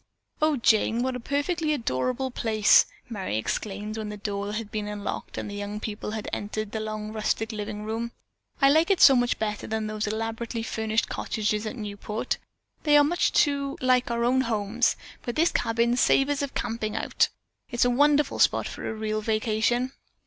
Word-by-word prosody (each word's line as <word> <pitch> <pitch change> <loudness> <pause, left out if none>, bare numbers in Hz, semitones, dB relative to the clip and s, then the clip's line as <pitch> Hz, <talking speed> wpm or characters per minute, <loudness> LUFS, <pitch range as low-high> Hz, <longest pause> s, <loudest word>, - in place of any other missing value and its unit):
"Oh, 310 -2 +3
Jane, 230 0 +3
what 260 0 -1
a - - -4
perfectly 305 +5 0
adorable 255 - -1
place," 220 -3 +4 0.2
Merry 195 - -3
exclaimed 210 - -3
when 215 -1 -4
the 210 - -6
door 200 0 -3
had 215 -1 -4
been 210 -1 -3
unlocked 210 -1 -5
and - - -3
the 205 - -6
young 205 +1 -4
people 210 -1 -5
had 215 0 -4
entered 210 0 -3
the 220 - -3
long 215 0 -4
rustic 220 0 -1
living 210 -1 -5
room. 225 +2 -3 0.5
"I 275 -1 +6
like 320 +5 +4
it 390 - +3
so 270 - +9
much 245 0 +2
better 210 -1 -3
than 220 0 -2
those 215 0 -2
elaborately 225 +2 -3
furnished 220 0 -1
cottages 210 0 -1
at 215 - -5
Newport. 210 -1 -4 0.4
They 295 -1 +5
are 290 - +6
too 280 -5 +2
much - - -11
like 255 -1 +3
our 235 0 0
own 255 +2 +3
homes, 225 0 +1 0.3
but 240 - -4
this 330 +2 +3
cabin 235 +1 +1
savors 275 +3 +3
of 280 -1 -4
camping 225 -2 -2
out. - - +1 0.4
It's 240 -1 +2
a 245 - +3
wonderful 290 +2 +3
spot - - +3
for - - -5
a 220 - -4
real 215 0 -2
vacation." 225 +3 +1
225 Hz, 185 wpm, -26 LUFS, 215-255 Hz, 0.5 s, so